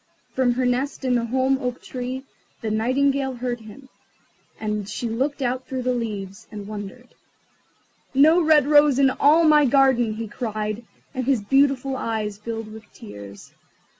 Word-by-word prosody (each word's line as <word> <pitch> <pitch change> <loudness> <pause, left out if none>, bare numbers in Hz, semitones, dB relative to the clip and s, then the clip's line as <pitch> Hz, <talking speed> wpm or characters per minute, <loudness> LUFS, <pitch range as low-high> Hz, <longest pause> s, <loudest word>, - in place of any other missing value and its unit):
From 255 -2 +2
her 255 +1 -1
nest 265 +3 -1
in 255 - +2
the 235 -1 +1
holm 260 +2 +1
oak 250 -2 -3
tree 255 +1 -6 0.4
the 220 - -2
Nightingale 265 +4 +1
heard 245 0 -3
him, 225 +5 -13 0.7
and 210 -2 -3
she 240 - -4
looked 270 +5 -2
out 255 +1 -2
through 260 -1 -4
the 250 0 +1
leaves, 205 -5 -5
and 205 -2 -7
wondered. 215 +4 -8 1.0
"No 310 +6 +5
red 310 -4 +5
rose 290 -2 +5
in 270 -1 +4
all 305 +5 +4
my 305 -2 +6
garden!" 255 -4 +3
he 225 +1 -5
cried, 215 0 -4 0.3
and 260 -2 -3
his 260 -5 +1
beautiful 270 +2 +2
eyes 215 -4 -3
filled 225 0 -6
with 220 -1 -13
tears. 100 - -12
250 Hz, 160 wpm, -23 LUFS, 220-270 Hz, 1.0 s, my